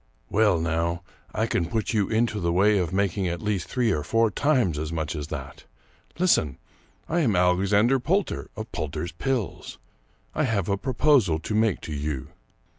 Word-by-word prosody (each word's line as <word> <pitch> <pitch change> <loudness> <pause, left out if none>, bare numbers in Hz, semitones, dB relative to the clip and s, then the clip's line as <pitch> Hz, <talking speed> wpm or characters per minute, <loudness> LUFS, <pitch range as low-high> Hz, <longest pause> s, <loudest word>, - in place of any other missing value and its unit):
" - - -39
Well, 105 -5 +3
now, 85 +1 -1 0.3
I - - 0
can 85 - 0
put 110 +2 -1
you 105 -3 +1
into 110 -1 +1
the 85 -2 0
way 100 +4 +4
of 90 -2 -1
making 95 0 0
at 85 0 -2
least 105 -4 -2
three 120 -3 +1
or 75 - 0
four 115 +6 +2
times 125 - +1
as 80 +1 -4
much 80 -1 -3
as 75 -1 -4
that. 75 -4 -7 0.5
Listen! 155 - +2 0.5
I 170 - 0
am 120 - +2
Alexander 100 +8 +3
Poulter, 190 +10 -1
of 110 +1 -7
Poulter's 75 +3 -4
Pills. 130 -6 -3 0.6
I 155 - +1
have 105 -7 0
a 100 - +2
proposal 125 - +2
to 105 - -4
make 110 -2 +2
to 80 - -6
you. 70 -3 -3
100 Hz, 180 wpm, -25 LUFS, 85-115 Hz, 0.6 s, way